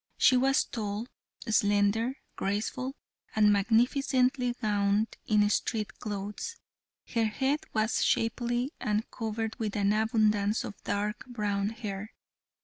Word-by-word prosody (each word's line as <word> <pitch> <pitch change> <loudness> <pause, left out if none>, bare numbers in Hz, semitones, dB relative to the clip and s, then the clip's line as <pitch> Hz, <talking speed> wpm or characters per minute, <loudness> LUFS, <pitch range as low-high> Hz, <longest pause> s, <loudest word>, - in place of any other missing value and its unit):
She 255 - +6
was 265 +2 +4
tall, 210 0 -4 0.4
slender, 210 +3 +2 0.2
graceful, 225 +7 -2 0.4
and 210 -1 +5
magnificently 250 +4 +2
gowned 205 -1 +1
in 210 -1 +4
street 215 -1 -1
clothes. 205 - -4 0.6
Her 230 -2 +3
head 265 +7 0
was 220 +1 +1
shapely 240 +3 0
and 215 -1 0
covered 225 -1 -3
with 215 -3 -2
an 205 0 +2
abundance 215 -1 +2
of - - -5
dark 210 +4 -2
brown 205 -4 -1
hair. 210 -2 -6
215 Hz, 115 wpm, -29 LUFS, 205-240 Hz, 0.6 s, She